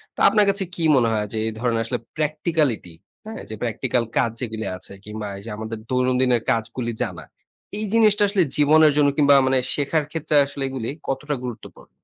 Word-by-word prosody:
তো - - -10
আপনার 210 -1 +4
কাছে 200 0 +1
কি 170 - -3
মনে 120 -3 +3
হয় 105 -1 0
যে - - -2
এই - - -2
ধরণের 115 -1 0
আসলে 125 +2 -2 0.2
practicality, 150 - -1 0.3
হ্যাঁ? 220 +1 -7
যে 110 - -5
practical 120 +1 0
কাজ 115 - +2
যেগুলি 110 -2 -4
আছে 90 - -8
কিংবা 105 0 -6
এইযে 105 +3 -9
আমাদের 110 +1 -5
দৈনন্দিনের 125 -1 +2
কাজগুলি 115 +1 -2
জানা। 85 -3 -3 0.5
এই 215 - -3
জিনিসটা 215 -2 +4
আসলে 200 -2 +2
জীবনের 155 +1 +5
জন্য 145 -1 +5
কিংবা 145 -1 +6
মানে 130 0 +3 0.2
শেখার 150 +2 0
ক্ষেত্রে 155 -1 -2
আসলে 140 0 -5
এগুলি 130 -4 -4 0.2
কতটা 145 +2 -2
গুরুত্বপূর্ণ? 120 -3 -9
130 Hz, 180 wpm, -22 LUFS, 115-155 Hz, 0.5 s, কিংবা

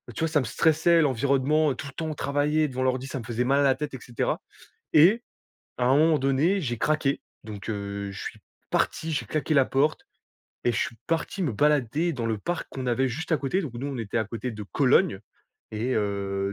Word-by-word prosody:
Tu - - -5
vois 165 - +1
ça 155 -1 +3
me 130 - -1
stressait 160 +7 +3
l'environnement, 140 +2 +2
heu, - - -3
tout 140 - -7
le 140 - -10
temps 160 0 -3
travailler 145 +2 +1
devant 130 0 -2
l'ordi 130 0 0
ça 135 - -4
me 115 - -8
faisait 120 +1 -1
mal 135 +3 +2
à - - +4
la 135 -2 +4
tête 145 +2 -5
et 130 - -6
cetera 120 +1 -2 0.5
et 185 +10 +6 0.6
à 125 - +1
un 130 +2 +5
moment 155 +1 +4
donné 140 +9 +2
j'ai 120 -8 -3
craqué. 150 -1 +1 0.2
Donc, 105 -2 -8
heu, 100 -1 -4
je 100 - -8
suis - - -7 0.3
parti, 160 0 0
j'ai 145 - -1
claqué 155 0 -1
la 135 -2 +6
porte 140 +4 +1 0.6
et - - +4
je 110 - -1
suis 115 - -2
parti 165 +4 -1
me 150 -8 0
balader 150 +6 +2
dans 120 -6 -3
le 110 -2 -1
parc 175 +11 -3
qu'on 130 -1 -5
avait 130 +2 +1
juste 160 +7 -4
à - - +5
côté. 145 +7 -1
Donc 145 -10 -6
nous 130 +4 -4
on 135 -3 -4
était 115 0 -2
à 110 - +1
côté 115 +3 -5
de 105 -1 -7
Cologne 135 - +2 0.5
et 115 +4 -1
heu, 100 -1 -1
135 Hz, 225 wpm, -26 LUFS, 115-155 Hz, 0.6 s, et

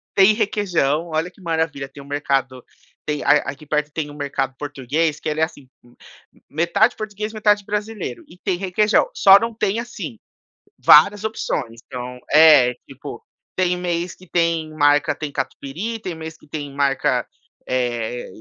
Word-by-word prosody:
Tem 195 +2 +6
requeijão, 180 -8 0
olha 160 +2 -2
que 195 - -21
maravilha, 160 -5 -2
tem 140 - -12
um - - -16
mercado 135 -3 -1 0.4
tem 150 -1 -2
a - - 0 0.2
aqui 140 +2 -8
perto 150 0 -1
tem 150 -1 -4
um - - -11
mercado 140 -2 -2
português, 145 +2 -2
que - - -6
ele 150 0 -2
é - - +3
assim, 160 -4 -5 0.2
m 120 0 -22 0.4
m - - -25
metade 185 - +2
português, 215 0 -5
metade 210 -1 +2
brasileiro, 210 - -4
e 180 - -16
tem 185 -1 -2
requeijão, 210 - +2
só 195 0 +7
não 230 +1 -3
tem, 215 0 0
assim, 205 - -7 0.6
várias 200 +7 +6
opções. 130 - -3
Então, 125 0 -7
é, 150 -5 +7 0.2
tipo, - - -9 0.3
tem 180 -1 +1
mês 175 0 -2
que 185 - -18
tem 165 -2 0
marca, 145 -1 +3
tem 150 -2 -6
catupiry, 160 +11 -4
tem 185 -5 -5
mês 160 0 -8
que - - -21
tem 145 -1 -6
marca, 140 -1 +1 0.4
eh 120 -1 -1
eh - - -10
160 Hz, 170 wpm, -21 LUFS, 140-195 Hz, 0.6 s, só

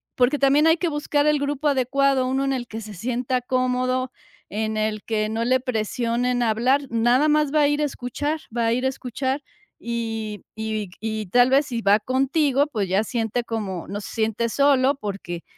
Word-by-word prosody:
porque 255 +3 +2
también 280 +3 +4
hay 325 +1 +5
que 345 +1 -1
buscar 295 -1 0
el 300 -1 +4
grupo 285 +1 -1
adecuado, 275 -1 +2
uno 265 +1 0
en 270 - 0
el 250 -2 -3
que 225 -1 -7
se 215 -1 -9
sienta 250 +5 -1
cómodo, 255 0 0 0.4
en 220 +1 -2
el 215 -1 -1
que 215 -1 -1
no 225 +1 -1
le 255 +2 +3
presionen 245 0 -1
hablar, 240 +5 +2
nada 240 +5 +3
más 300 -1 +2
va 305 - +4
a 290 - +5
ir 290 +1 0
a 300 - +2
escuchar 290 +4 -3 0.2
va 235 -1 +1
a - - +2
ir 255 +2 -1
a - - +3
escuchar 265 +2 -3 0.4
y 225 -3 -4
y 220 -2 -3
y 220 -1 -3
tal 245 +7 +4
vez 275 +1 +4
si 235 -3 -3
va 205 +1 +4
contigo, 275 +3 +1
pues, 210 -9 -2
ya 195 +3 +2
siente 230 +1 -2
como 205 -7 -4
no 200 +2 -5
se - - -8
siente 225 +1 0
solo 280 +1 +3
porque 195 -8 -6
250 Hz, 195 wpm, -23 LUFS, 220-275 Hz, 0.4 s, hay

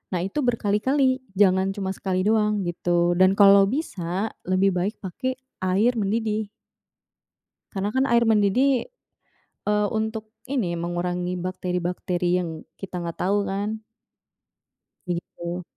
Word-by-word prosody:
Nah, 175 - -1
itu 195 +10 -3
berkali-kali, 255 +2 +2 0.2
jangan 190 -1 +3
cuma 195 -2 -3
sekali 185 -1 -2
doang 210 -1 +2
gitu, 175 0 +1
dan 185 +1 +5
kalo 200 -1 +7
bisa 200 - -2 0.2
lebih 185 +1 +3
baik 185 +4 -1
pake 255 +8 -3 0.2
air 190 +6 +2
mendidih. 215 +1 -1 1.2
Karena 200 0 -2
kan 260 0 +3
air 235 0 +4
mendidih, 230 - +3 0.8
eee, 210 0 +2
untuk 220 0 -3 0.2
ini 215 -11 -1
mengurangi 175 +1 -2
bakteri-bakteri 180 0 -1
yang 165 -3 -4 0.2
kita 180 -2 -5
gak 170 -1 -5
tau 200 +2 +1
kan. 205 +3 -3 1.2
Begitu. 175 0 -4
195 Hz, 120 wpm, -24 LUFS, 180-220 Hz, 1.2 s, kalo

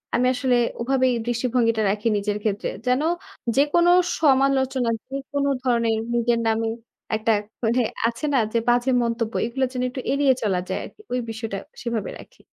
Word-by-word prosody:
আমি 250 +1 +2
আসলে 255 -1 +1 0.3
ওভাবেই 260 0 +2
দৃষ্টিভঙ্গিটা 240 -2 +1
রাখি 210 +3 -1
নিজের 205 0 -1
ক্ষেত্রে। 210 -1 -1 0.2
যেন 250 +3 +3 0.5
যেকোনো 320 +5 +4 0.3
সমালোচনা, 265 -3 +3 0.2
যেকোন 275 +1 -3 0.2
ধরনের, 230 -3 +2 0.2
নিজের 235 0 +2
নামে 225 0 +1 0.5
একটা 220 +1 +1
এক 205 - -10 0.2
মানে 235 +3 +2 0.3
আছে 235 +6 -3
না? - - +4 0.2
যে, - - +2
বাজে 245 +2 +3
মন্তব্য। 230 -1 -2
এগুলো 260 +3 0
যেন 250 - -2
একটু 260 0 -6
এড়িয়ে 280 -1 +4
চলা 190 -4 +1
যায় - - -1
আরকি। 425 - -14
ওই 250 - +1
বিষয়টা 220 -2 -4 0.2
সেভাবে 230 -4 -3
রাখি। - - -19
240 Hz, 160 wpm, -23 LUFS, 225-265 Hz, 0.5 s, যেকোনো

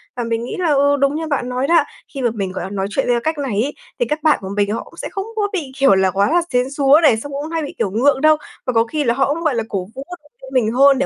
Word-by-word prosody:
Và 240 - -2
mình 230 0 -2
nghĩ 250 - -5
là, 345 -3 +1
ừ, 285 +1 +3
đúng 275 +1 +2
như 320 0 -3
bạn 265 -4 -1
nói 255 +2 -1
đó, 335 0 +5 0.3
khi 270 - -4
mà 240 - +2
mình, 195 -4 -3
gọi - - -5
là, 190 - -5
nói 195 -1 -2
chuyện 265 +6 -1
theo 240 -1 +2
cách 315 -1 -1
này 240 -7 -1
ấy, 290 - -3 0.3
thì 485 - +2
các 300 +1 -3
bạn 310 - +4
của 190 - -6
mình 205 0 0
họ 225 - -3
cũng - - -18
sẽ - - -5
không 390 -1 -4
có 415 -1 +1
bị, 295 -8 -3
kiểu 270 -7 +5
là, 190 -1 +2
quá 200 +4 +2
là 345 +2 +3
sến 250 +2 +1
súa 285 +1 +4
này, 235 -7 +5
xong 285 +5 -7
cũng 290 +3 -4
hay 325 -1 -1
bị, 285 - -6
kiểu, 190 - -1
ngượng 265 +5 +2
đâu. 310 0 +5 0.3
Và 255 - -1
có 225 0 +4
khi 300 +4 -2
là 235 -2 +2
họ 275 +2 +1
cũng, 335 +2 -5
gọi 295 -6 +1
là, 225 - 0
cổ 190 -2 -3
vũ, 270 - -6 0.2
động 295 - -25
viên 265 0 -10
mình 225 -4 +2
hơn 275 +1 +5
để, 275 - +1
270 Hz, 330 wpm, -19 LUFS, 230-295 Hz, 0.3 s, đó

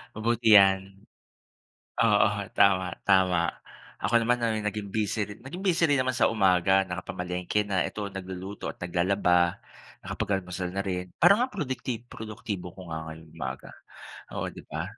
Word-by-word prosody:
mabuti 110 0 +3
yan. 95 0 +4 1.0
Oo, - - +5 0.3
tama-tama 90 -2 +3 0.5
ako 120 0 +4
naman 120 +2 +2
ay 110 -2 0
naging 105 -1 -4
busy 105 -1 0
ri 105 - -9
naging 175 +10 -8
busy 170 -3 +3
rin 145 - +3
naman 130 -1 +1
sa 125 - +3
umaga, 95 -2 +3
nakapamalengke 90 +1 -3
na. 95 -3 0
Ito 100 -2 -6
nagluluto 95 +1 -6
at - - -6
naglalaba, 90 0 +2 0.5
nakapag-almusal 90 -2 -3
na 100 - -1
rin. 90 -2 -3
Parang 200 +3 +6
nga 250 - +3
ang 255 - -20
produkti 130 - -3
produktibo 105 -5 -6
ko 90 -4 -9
nga 80 0 -5
ngayong 80 0 -11
umaga, 65 -5 -6 0.6
oo, - - -2
'di - - -10
ba? - - -3
95 Hz, 150 wpm, -27 LUFS, 90-110 Hz, 1.0 s, Parang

